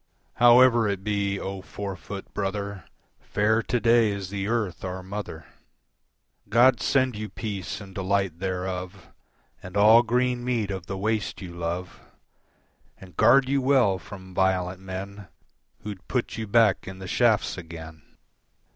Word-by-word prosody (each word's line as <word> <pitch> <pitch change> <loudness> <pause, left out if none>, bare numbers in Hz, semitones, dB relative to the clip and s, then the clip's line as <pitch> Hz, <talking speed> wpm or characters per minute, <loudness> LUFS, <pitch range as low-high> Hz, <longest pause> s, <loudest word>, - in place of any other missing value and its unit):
"However 120 -1 +6
it 100 -2 -2
be, 100 -1 -1
O 95 0 -5
four 100 0 -6
foot 100 +2 -9
brother, 100 -1 -3 0.3
Fair 110 +2 +1
to 120 - -1
day 115 -1 +4
is 100 -2 -4
the 100 -1 -3
earth, 110 -6 -2
our 95 0 -5
mother. 95 -5 -6 1.0
"God 120 +1 +5
send 130 -1 +2
you 105 0 -5
peace 100 -7 -5
and 100 -2 -11
delight 95 -2 -1
thereof, 90 0 -4 0.5
And 90 +2 -6
all 110 +3 +7
green 125 +1 0
meat 115 -5 -1
of 95 -2 -6
the 95 - -4
waste 110 +2 -1
you 90 -3 -8
love, 85 +1 -4 1.0
"And 90 -4 -14
guard 130 - +5
you 140 0 +1
well 130 -8 +3
from 95 -1 -11
violent 95 0 0
men 95 +1 -7 0.6
Who'd 100 -2 -8
put 125 -2 -2
you 110 -1 -4
back 110 -1 +3
in 95 0 -7
the 95 0 -8
shafts 110 +1 +2
again." 80 -2 -9
100 Hz, 145 wpm, -25 LUFS, 95-115 Hz, 1.0 s, all